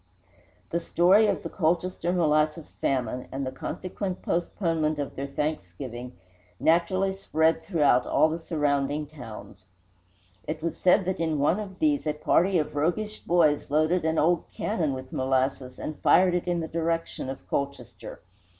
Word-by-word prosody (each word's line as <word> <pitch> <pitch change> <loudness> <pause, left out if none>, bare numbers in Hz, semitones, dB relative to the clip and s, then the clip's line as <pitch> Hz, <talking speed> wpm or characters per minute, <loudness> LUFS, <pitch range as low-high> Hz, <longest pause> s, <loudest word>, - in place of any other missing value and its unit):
The 170 - +1
story 185 +6 +4
of - - -1
the - - -4
Colchester 175 0 0
molasses 155 -2 +1
famine, 125 -2 -1
and 135 0 -3
the 130 - -3
consequent 185 +7 -5
postponement 165 -3 0
of 145 -2 -4
their 140 +1 -4
Thanksgiving, 125 - -4 0.5
naturally 185 +4 +2
spread 160 -4 +1
throughout 145 -9 +3
all - - +4
the 160 +1 -3
surrounding 145 -2 0
towns. 125 -10 -11 0.8
It 155 0 -4
was 170 - -1
said 185 +1 +3
that 185 0 -2
in 160 -2 0
one 150 +7 +2
of 195 -3 -7
these 295 - +1
a 150 - +1
party 180 +5 +2
of 150 -2 -2
roguish 210 +8 -1
boys 160 -4 +2
loaded 155 +4 +2
an 160 0 0
old 170 +3 +2
cannon 170 -9 -1
with 130 0 -8
molasses 130 -1 0
and 155 - -6
fired 185 -1 +5
it 180 0 -1
in 175 -1 0
the 160 - -3
direction 165 -4 -2
of 135 - -8
Colchester. 140 0 -5
160 Hz, 155 wpm, -27 LUFS, 140-175 Hz, 0.8 s, fired